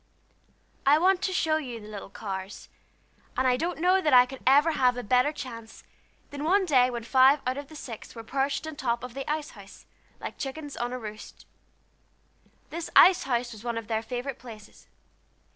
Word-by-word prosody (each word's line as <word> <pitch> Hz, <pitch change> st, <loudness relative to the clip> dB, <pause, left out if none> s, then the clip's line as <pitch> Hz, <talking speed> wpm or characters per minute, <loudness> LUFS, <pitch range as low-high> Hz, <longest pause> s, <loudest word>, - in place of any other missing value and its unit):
I 285 Hz, +2 st, +5 dB
want 370 Hz, +3 st, +3 dB
to 380 Hz, -, -1 dB
show 320 Hz, -4 st, +1 dB
you 250 Hz, -7 st, -6 dB
the 210 Hz, -, -12 dB
little 205 Hz, -2 st, -8 dB
Carrs, 195 Hz, -1 st, -7 dB, 0.7 s
and 260 Hz, -, +1 dB
I 250 Hz, -, +4 dB
don't 335 Hz, +7 st, -2 dB
know 365 Hz, +3 st, +3 dB
that 300 Hz, -6 st, +1 dB
I 250 Hz, 0 st, +8 dB
could 265 Hz, +1 st, -10 dB
ever 290 Hz, +5 st, +5 dB
have 250 Hz, -4 st, +2 dB
a 245 Hz, -, -4 dB
better 250 Hz, +6 st, +3 dB
chance 230 Hz, -6 st, -9 dB, 0.5 s
than 285 Hz, 0 st, -6 dB
one 380 Hz, +5 st, +3 dB
day 255 Hz, -6 st, +4 dB
when 240 Hz, -2 st, -5 dB
five 265 Hz, +4 st, +5 dB
out 255 Hz, +1 st, 0 dB
of 285 Hz, 0 st, -7 dB
the 310 Hz, -, -13 dB
six 240 Hz, -7 st, -9 dB
were 230 Hz, -, -8 dB
perched 275 Hz, +5 st, -1 dB
on 315 Hz, -2 st, -7 dB
top 240 Hz, -3 st, -1 dB
of 250 Hz, -1 st, -7 dB
the 275 Hz, +1 st, -6 dB
ice 300 Hz, 0 st, -2 dB
house, 200 Hz, -2 st, -14 dB, 0.3 s
like -, -, -7 dB
chickens 285 Hz, +1 st, -6 dB
on 240 Hz, +1 st, -3 dB
a 255 Hz, -, -3 dB
roost. 215 Hz, -3 st, -10 dB, 1.3 s
This 335 Hz, +1 st, -5 dB
ice 370 Hz, -1 st, +7 dB
house 245 Hz, -2 st, -1 dB
was 220 Hz, -1 st, -11 dB
one 235 Hz, -1 st, -3 dB
of 230 Hz, -, -4 dB
their 220 Hz, -1 st, -1 dB
favorite 250 Hz, +3 st, -5 dB
places. 215 Hz, -4 st, -13 dB
255 Hz, 195 wpm, -27 LUFS, 235-300 Hz, 1.3 s, I